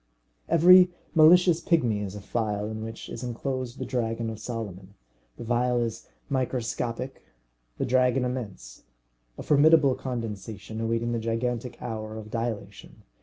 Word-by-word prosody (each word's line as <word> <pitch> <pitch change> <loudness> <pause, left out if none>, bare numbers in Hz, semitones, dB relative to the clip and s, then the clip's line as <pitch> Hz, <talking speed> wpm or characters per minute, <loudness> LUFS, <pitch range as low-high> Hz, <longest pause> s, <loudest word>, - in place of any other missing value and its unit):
Every 180 +2 +7 0.2
malicious 170 +1 +6
pigmy 125 - +2
is 100 -1 -5
a 105 - -7
phial 105 0 -2
in 110 0 -5
which 115 0 -7
is - - -7
enclosed 125 0 -4
the - - -4
dragon 115 -2 -2
of 110 - -8
Solomon. 100 -5 -6 0.4
The - - -7
phial 120 +1 +1
is 115 -1 -3 0.2
microscopic, 125 -1 -2 0.6
the - - -1
dragon 125 0 +2
immense. 115 - -6 0.6
A - - -6
formidable 150 -1 +5
condensation, 110 -4 -5
awaiting 115 +1 -1
the 120 - -1
gigantic 115 +2 -2
hour 110 -1 -5
of 110 -1 -9
dilation! 110 -4 -5
115 Hz, 135 wpm, -27 LUFS, 110-130 Hz, 0.6 s, Every